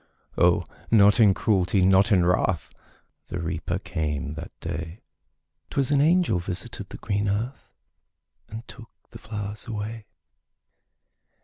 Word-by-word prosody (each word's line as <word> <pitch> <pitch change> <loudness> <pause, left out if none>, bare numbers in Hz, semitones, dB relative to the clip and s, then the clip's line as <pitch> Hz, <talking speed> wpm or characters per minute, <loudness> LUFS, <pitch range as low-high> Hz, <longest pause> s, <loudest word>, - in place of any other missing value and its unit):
O, - - +3 0.2
not 105 -1 +6
in 100 -4 +6
cruelty, 95 -3 +2
not 95 +3 +4
in 90 -4 +4
wrath, 90 -1 +1 0.5
The - - -5
Reaper 85 +1 -2
came 75 -7 -3
that 80 +6 -8
day; 85 +2 -6 0.7
'Twas 140 -1 0
an 140 -1 +4
angel 170 - +3
visited 95 +5 -5
the - - -8
green 100 -1 -1
earth, 115 +7 -3 0.8
And 110 +2 -8
took 115 -2 -11 0.2
the - - -10
flowers 105 -1 -6
away. 110 -1 -5
100 Hz, 125 wpm, -25 LUFS, 90-110 Hz, 0.8 s, not